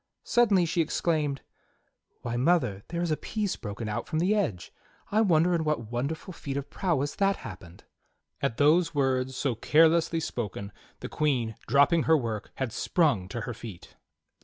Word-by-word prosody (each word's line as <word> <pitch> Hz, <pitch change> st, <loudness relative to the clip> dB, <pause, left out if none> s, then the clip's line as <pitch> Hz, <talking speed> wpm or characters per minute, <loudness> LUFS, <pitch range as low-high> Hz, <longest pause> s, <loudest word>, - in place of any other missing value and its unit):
Suddenly 205 Hz, -7 st, +3 dB
she 170 Hz, +1 st, +1 dB
exclaimed: 155 Hz, -3 st, 0 dB, 0.8 s
"Wliy 120 Hz, 0 st, -2 dB
mother, 125 Hz, -, +2 dB
there 170 Hz, 0 st, -3 dB
is 170 Hz, -, -1 dB
a 155 Hz, -, +1 dB
piece 210 Hz, -3 st, -2 dB
broken 105 Hz, 0 st, -6 dB
out 105 Hz, +2 st, -3 dB
from 155 Hz, -, -2 dB
the 180 Hz, +6 st, +2 dB
edge! 160 Hz, -, -2 dB, 0.4 s
I 215 Hz, +2 st, +3 dB
wonder 175 Hz, -3 st, +3 dB
in 165 Hz, -2 st, +1 dB
what 135 Hz, -8 st, -2 dB
wonderful 145 Hz, +9 st, -3 dB
feat 140 Hz, -4 st, -5 dB
of 140 Hz, -, -5 dB
prowess 145 Hz, -6 st, -1 dB
that 195 Hz, 0 st, +2 dB
happened!" 95 Hz, -6 st, -11 dB, 0.6 s
At 115 Hz, -, -1 dB
those 165 Hz, +3 st, +3 dB
words, 130 Hz, -2 st, +1 dB
so 135 Hz, -1 st, 0 dB
carelessly 165 Hz, +7 st, +3 dB
spoken, 105 Hz, -8 st, -4 dB, 0.3 s
the -, -, -5 dB
Queen, 130 Hz, -7 st, 0 dB
dropping 145 Hz, +4 st, +4 dB
her 160 Hz, -, +7 dB
work, 110 Hz, -6 st, -4 dB
had 130 Hz, -4 st, -3 dB
sprung 135 Hz, -, +1 dB
to 115 Hz, +4 st, -5 dB
her 125 Hz, -, -4 dB
feet. 110 Hz, -5 st, -10 dB
145 Hz, 165 wpm, -28 LUFS, 120-170 Hz, 0.8 s, her